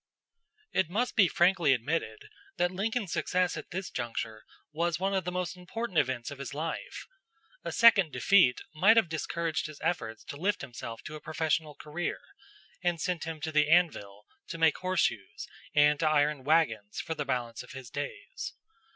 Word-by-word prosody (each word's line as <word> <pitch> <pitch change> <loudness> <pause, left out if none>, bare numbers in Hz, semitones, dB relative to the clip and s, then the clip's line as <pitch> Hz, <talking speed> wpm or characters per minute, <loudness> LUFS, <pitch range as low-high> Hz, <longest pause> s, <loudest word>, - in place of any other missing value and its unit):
It 180 - +1
must 235 +7 -1
be 200 -4 +6
frankly 175 -5 +4
admitted 165 - -2 0.3
that 175 0 +2
Lincoln's 205 +1 -2
success 180 -1 +1
at - - -7
this 190 +1 -5
juncture 110 -2 -4 0.3
was 170 +2 -1
one 195 +1 0
of 190 -1 0
the 180 - -2
most 180 0 -3
important 180 +1 -2
events 130 -1 -1
of 140 - -8
his 140 0 -6
life. 165 - -4 0.6
A - - -3
second 210 -8 +6
defeat 125 0 +4
might 200 +9 +5
have 225 - +5
discouraged 160 0 -2
his 155 -2 -11
efforts 115 -11 -2
to 140 - -8
lift 195 +6 0
himself 115 -2 -7
to 155 - -8
a 155 - -8
professional 155 -1 -1
career, 155 +4 -4 0.6
and 175 -2 0
sent 180 -2 -2
him 160 -1 -5
to 160 - -3
the 150 -1 +3
anvil 105 - +2 0.2
to 165 - -5
make 160 -2 +3
horseshoes 160 - -1 0.3
and 150 0 +5
to 160 - +2
iron 150 -2 +2
wagons 130 -9 +1
for 165 - -3
the 150 - -3
balance 125 -4 -2
of - - -12
his 130 -3 -9
days. 410 - -6
160 Hz, 175 wpm, -30 LUFS, 140-180 Hz, 0.6 s, be